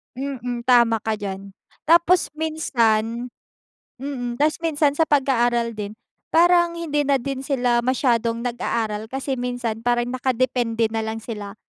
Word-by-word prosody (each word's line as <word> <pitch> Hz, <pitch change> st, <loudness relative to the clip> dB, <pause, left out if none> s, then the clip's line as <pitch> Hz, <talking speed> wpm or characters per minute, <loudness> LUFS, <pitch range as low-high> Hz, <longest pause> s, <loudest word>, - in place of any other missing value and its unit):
Mm, 250 Hz, -3 st, -4 dB
tama 235 Hz, -3 st, +4 dB
ka 220 Hz, -1 st, -2 dB
diyan. 195 Hz, -1 st, -6 dB, 0.3 s
Tapos 340 Hz, +2 st, +4 dB
minsan 240 Hz, -7 st, 0 dB, 0.7 s
mm. 255 Hz, -3 st, -4 dB
Ta's 300 Hz, +5 st, +1 dB
minsan 305 Hz, -3 st, +1 dB
sa 315 Hz, +3 st, +1 dB
pag-aaral 240 Hz, -4 st, +2 dB
din 210 Hz, -1 st, -6 dB, 0.4 s
parang 345 Hz, 0 st, +5 dB
hindi 325 Hz, -3 st, -2 dB
na 280 Hz, -, +4 dB
din 270 Hz, +1 st, -3 dB
sila 245 Hz, -4 st, +1 dB
masyadong 235 Hz, -2 st, 0 dB
nag-aaral 225 Hz, -3 st, -2 dB
kasi 265 Hz, +2 st, -3 dB
minsan 245 Hz, -3 st, -3 dB
parang 240 Hz, 0 st, +1 dB
nakadepende 245 Hz, -3 st, 0 dB
nalang 220 Hz, 0 st, -3 dB
sila. 210 Hz, -3 st, -7 dB
245 Hz, 130 wpm, -22 LUFS, 230-280 Hz, 0.7 s, parang